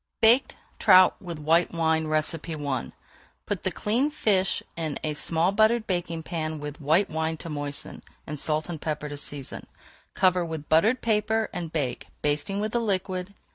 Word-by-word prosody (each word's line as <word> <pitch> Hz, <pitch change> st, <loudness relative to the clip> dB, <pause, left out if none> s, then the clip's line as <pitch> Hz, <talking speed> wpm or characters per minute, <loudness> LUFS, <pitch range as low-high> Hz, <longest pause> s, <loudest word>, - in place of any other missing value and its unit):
BAKED 235 Hz, +4 st, +5 dB, 0.2 s
TROUT 185 Hz, -2 st, +6 dB
WITH 175 Hz, -4 st, -6 dB
WHITE 165 Hz, +4 st, +2 dB
WINE 160 Hz, -1 st, +1 dB
I 155 Hz, -3 st, -2 dB, 0.5 s
Put -, -, -2 dB
the -, -, 0 dB
cleaned 260 Hz, +8 st, 0 dB
fish 190 Hz, -7 st, +1 dB
in 160 Hz, -4 st, -3 dB
a 155 Hz, -, -1 dB
small 165 Hz, +4 st, +1 dB
buttered 220 Hz, +2 st, +3 dB
baking 175 Hz, -4 st, -2 dB
pan 160 Hz, -2 st, -3 dB
with 150 Hz, +1 st, -7 dB
white 160 Hz, +7 st, +3 dB
wine 160 Hz, 0 st, -2 dB
to 165 Hz, -, -8 dB
moisten, 145 Hz, -1 st, -3 dB, 0.2 s
and 150 Hz, -1 st, -4 dB
salt 155 Hz, +1 st, +1 dB
and 165 Hz, -4 st, -6 dB
pepper 150 Hz, -1 st, -3 dB
to 145 Hz, -, -6 dB
season. 145 Hz, -2 st, -3 dB, 0.5 s
Cover 185 Hz, -1 st, +3 dB
with 160 Hz, -3 st, -6 dB
buttered 215 Hz, +11 st, +3 dB
paper 220 Hz, 0 st, +1 dB
and 170 Hz, -3 st, -4 dB
bake, 145 Hz, -6 st, -2 dB, 0.2 s
basting 150 Hz, +7 st, 0 dB
with 215 Hz, +1 st, -2 dB
the 240 Hz, -, +1 dB
liquid. 190 Hz, -2 st, -2 dB
165 Hz, 165 wpm, -26 LUFS, 155-200 Hz, 0.5 s, TROUT